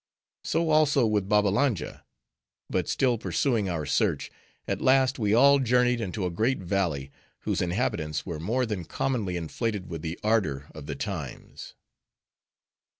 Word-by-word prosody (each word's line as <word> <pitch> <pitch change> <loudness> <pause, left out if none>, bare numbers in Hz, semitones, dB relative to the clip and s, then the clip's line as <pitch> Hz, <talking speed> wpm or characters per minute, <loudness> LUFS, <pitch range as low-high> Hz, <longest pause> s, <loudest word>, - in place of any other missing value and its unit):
So 165 -1 0
also 150 -4 +4
with 105 -3 0
Babbalanja. 105 - +1 0.7
But - - -1
still 125 -4 +1
pursuing 115 -5 0
our 80 -4 -2
search, 70 - 0 0.4
at - - -2
last 130 0 +3
we 105 -1 +2
all 140 +3 +6
journeyed 125 -1 +2
into 95 -1 -3
a 90 - -1
great 115 +10 +1
valley, 85 -7 -2 0.3
whose - - -1
inhabitants 85 - -1
were 85 -4 -5
more 120 +10 0
than 105 -6 -3
commonly 105 -3 -2
inflated 95 +3 -3
with 80 -2 -5
the 80 +1 -5
ardor 75 -11 0
of 75 -2 -10
the - - -4
times. - - -6
105 Hz, 145 wpm, -27 LUFS, 85-125 Hz, 0.7 s, all